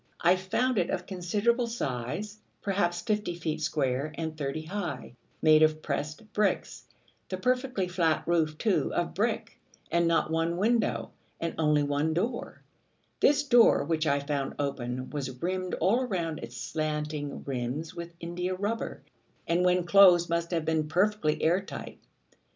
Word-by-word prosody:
I 175 +2 +5
found 210 +6 0
it 175 - 0
of - - -2
considerable 210 +6 0
size, 205 - -4 0.2
perhaps 175 -3 0
fifty 210 -2 -1
feet 160 -2 -3
square, 140 -1 0
and 160 -1 -3
thirty 150 +1 -3
high, 185 -5 -5 0.3
made 155 0 +6
of 155 0 +3
pressed 155 +9 -4
bricks, 210 -1 0 0.4
the 185 - -3
perfectly 250 -2 0
flat 170 -3 +1
roof, 160 -3 +1
too, 215 +1 +1
of 175 - -1
brick, 220 +4 -2 0.3
and 170 0 +3
not 165 -1 +2
one 165 +1 0
window, 200 - +1 0.3
and 165 0 -2
only 150 -2 +3
one 145 +2 0
door: 235 +8 -3 0.6
this 290 0 +4
door, 240 - +5
which 160 +1 0
I 140 0 +3
found 140 -1 -2
open, 130 -3 -3
was 130 -4 -4
rimmed 185 +2 -2
all 215 +9 +2
round 170 -7 -2
its 115 +2 -8
slanting 150 +3 -3
rims 135 +4 -3
with 170 0 -8
india 180 +2 -3
rubber, 205 +4 -3 0.4
and 170 +2 +2
when 180 0 +3
closed 175 -2 +6
must 170 0 0
have 165 -3 -1
been 160 -1 +1
perfectly 180 -1 +1
air 175 +4 +3
tight. 195 - -8
170 Hz, 150 wpm, -29 LUFS, 150-195 Hz, 0.6 s, made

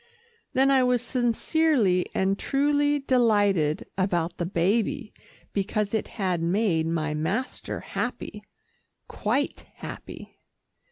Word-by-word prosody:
Then 270 +1 +4
I 265 -1 +5
was 250 -1 +2
sincerely 240 - +2
and 195 +1 +1
truly 290 +1 +2
delighted 205 - +2
about 175 -2 0
the 175 - -2
baby, 210 +8 0 0.4
because 205 +1 -1
it 220 - 0
had 185 -5 0
made 170 -2 +1
my 160 -2 -1
master 195 - -2
happy, - - -4 0.7
quite 260 +7 -2
happy. - - -9
210 Hz, 105 wpm, -26 LUFS, 180-255 Hz, 0.7 s, I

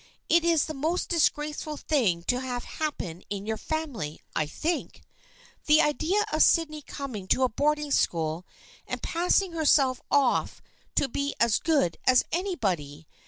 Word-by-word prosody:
It 340 0 +4
is 335 -3 +3
the 310 - -5
most 315 +6 -1
disgraceful 300 -2 0
thing 215 - +1
to 245 +7 0
have 250 -2 -4
happen 185 - -4
in 200 0 -4
your 220 0 -1
family, 250 - -4 0.2
I 155 - 0
think. 325 - -3 0.6
The 305 +1 +6
idea 335 +8 +1
of 310 - +2
Sydney 310 -3 +3
coming 255 -10 -7
to 260 - +2
a 255 - +3
boarding 295 +4 0
school 165 - 0 0.4
and - - -5
passing 360 +2 +1
herself 280 -5 +3
off 280 -3 +2 0.4
to - - +2
be 280 +3 -3
as 230 -1 +3
good 280 - +1
as 255 -1 +6
anybody 185 - -2
280 Hz, 150 wpm, -27 LUFS, 215-315 Hz, 0.6 s, The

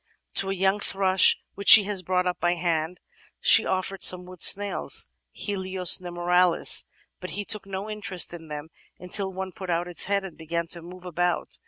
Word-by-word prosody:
To 195 - +1
a 195 - -2
young 190 +2 0
thrush 190 -2 +2 0.2
which 200 - -2
she 225 -4 +11
has 200 -1 -3
brought 180 0 -1
up 180 -1 -3
by 175 0 0
hand 165 0 -3 0.4
she - - +5
oflFered 190 +1 -3
some 180 -2 +4
wood 180 -1 -14
snails 195 - +1 0.2
{Helios 190 - +1
nemoralis), 175 0 +2 0.3
but 185 - -8
he 205 - -3
took 215 -2 -4
no 195 +1 -6
interest 205 -5 -2
in 165 -2 -11
them 150 +1 -8 0.3
until 190 +2 -4
one 190 0 -7
put 185 +1 -10
out 170 +1 -2
its 175 - -1
head 200 0 -1
and 190 -4 -10
began 170 +1 -4
to 170 - -4
move 180 +2 -13
about. 175 0 -3
185 Hz, 185 wpm, -24 LUFS, 175-195 Hz, 0.4 s, she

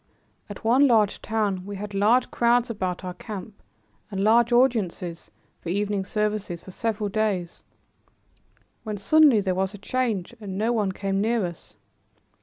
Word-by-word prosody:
At 205 - -9
one 260 +5 +5
large 215 -5 +2
town 210 -4 -1
we 200 +1 -7
had 205 +1 -6
large 215 +6 +3
crowds 240 0 +2
about 185 -4 -3
our 180 -1 -5
camp 205 +1 -9 0.5
and 195 -1 -2
large 235 +3 +4
audiences 215 -9 +1 0.3
for 165 - -7
evening 200 +1 -1
services 210 -4 -2
for 190 - -10
several 215 +1 -2
days, 200 -4 -2 1.2
when 215 -2 -4
suddenly 280 +1 +5
there 190 -2 0
was 190 +2 -1
a - - -9
change 225 -3 -2
and 195 -2 -6
no 220 +3 +1
one 210 -4 0
came 195 +1 -2
near 225 -1 +1
us. 170 -2 -9
205 Hz, 155 wpm, -25 LUFS, 190-230 Hz, 1.2 s, one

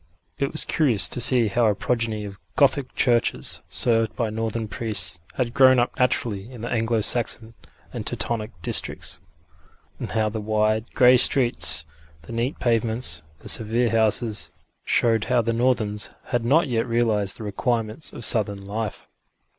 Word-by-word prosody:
It 140 - -1
was 155 - 0
curious 130 -10 +2
to 125 - 0
see 125 -1 +4
how 115 +3 +2
a 105 - +2
progeny 110 0 -2
of 100 0 -9 0.2
Gothic 140 -2 +2
churches, 120 -2 +1
served 115 -2 +1
by 115 -3 -2
northern 110 0 -3
priests, 100 -7 -1 0.2
had 120 -2 -2
grown 130 -1 +6
up 120 0 0
naturally 115 -4 0
in 120 -4 -10
the 120 - -4
Anglo 115 -1 0
Saxon 115 0 +1 0.4
and - - -4
Teutonic 110 -2 -2
districts, - - -3 0.8
and - - -6
how 110 -1 +1
the 110 0 -4
wide, 110 +1 0
grey 125 0 +6
streets, 120 - +2 0.4
the - - -11
neat 120 +5 -2
pavements, 115 - -1 0.2
the - - -11
severe 115 +1 +1
houses, 110 0 +1 0.3
showed 115 -3 +1
how 120 0 +1
the 115 +1 0
northerns 115 -4 0 0.2
had 120 -2 0
not 150 +7 +3
yet 115 -1 -1
realised 110 -4 0
the - - -8
requirements 110 +5 -2
of 120 - -4
southern 100 -3 +4
life. 105 +1 -5
115 Hz, 155 wpm, -23 LUFS, 110-120 Hz, 0.8 s, grown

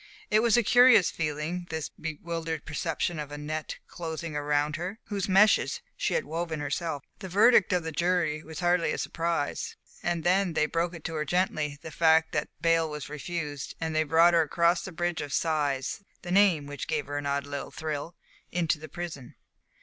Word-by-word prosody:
It 215 - +5
was 235 -1 +4
a 240 - +4
curious 245 -4 +6
feeling 160 +3 -3
this 160 -2 -3
bewildered 160 0 -5
perception 165 +2 -2
of 145 -1 -5
a 145 - -5
net 155 +1 -4
closing 165 -1 -5
round 145 0 0
her, 180 +5 -4
whose 200 -2 -2
meshes 210 - +4 0.2
she - - -1
had 485 - 0
woven 165 -1 -3
herself. 145 0 -3 0.2
The 190 -2 -7
verdict 210 +2 +5
of 180 -2 +1
the 160 - -4
jury 170 -1 +1
was 160 +2 -8
hardly 175 -1 +2
a - - -3
surprise. 165 -3 -2 0.3
And 170 -2 -1
then 185 0 +2
they 155 - +2
broke 170 +1 -2
to 165 - -4
her 155 -1 -1
gently 155 -3 0
the 160 - -7
fact 160 0 +4
that 150 - -1
bail 165 -1 +3
was 150 -2 -6
refused, 150 -2 -5
and 160 -1 -2
they 155 - +4
brought 165 +3 +5
her 170 - +5
across 170 +2 +2
the 190 - -7
Bridge 175 -1 -2
of 145 -2 -5
Sighs, 145 -2 0 0.2
the 175 - -5
name 190 -6 +4
of 140 - -10
which 145 -1 -5
gave - - -1
her 145 +1 -3
an 145 - -4
odd 140 0 -1
little 145 -1 -5
thrill, 155 +2 -5 0.4
into 165 -3 0
the 155 - -9
prison. 160 -8 -7
165 Hz, 195 wpm, -28 LUFS, 150-175 Hz, 0.4 s, curious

